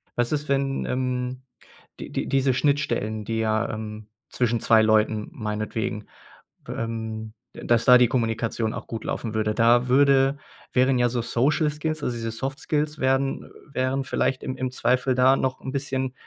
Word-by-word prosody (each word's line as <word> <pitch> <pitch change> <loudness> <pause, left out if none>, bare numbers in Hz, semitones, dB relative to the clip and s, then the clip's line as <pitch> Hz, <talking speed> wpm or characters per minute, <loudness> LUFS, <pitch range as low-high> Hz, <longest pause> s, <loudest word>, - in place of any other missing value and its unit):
was 120 -1 0
ist, 150 -1 -2
wenn, 135 0 0
ähm 125 0 -2 0.6
die - - -8
die - - -2
diese 135 -1 +2
Schnittstellen, 125 -6 0
die 115 +1 -2
ja, 110 0 0
ähm, 110 -1 -7 0.2
zwischen 120 -2 0
2 110 0 +5
Leuten 110 0 +2
meinetwegen, 105 0 -4 0.6
ähm 110 -1 -5 0.2
da - - -10
dass 120 -1 +2
da 125 -1 +9
die 125 -1 +5
Kommunikation 115 -2 -1
auch - - -6
gut 115 - -6
laufen 115 -3 -3
würde? 105 -1 0
Da 120 +1 +4
würde 135 +1 +4 0.4
wären 130 0 +3
ja 120 0 +3
so 120 0 -1
Social 150 +7 +1
Skills, 155 0 -4
also 120 - -1
diese 115 -1 -3
Soft 135 +5 -4
Skills 150 0 -1
werden 135 +1 0 0.2
wären 130 +1 0
vielleicht 130 -1 -1
im 130 - -3
im 130 0 -2
Zweifel 130 0 +1
da 130 +1 +5
noch 130 -1 -1
'n 130 - -5
bisschen 130 -2 -2
125 Hz, 170 wpm, -24 LUFS, 115-135 Hz, 0.6 s, da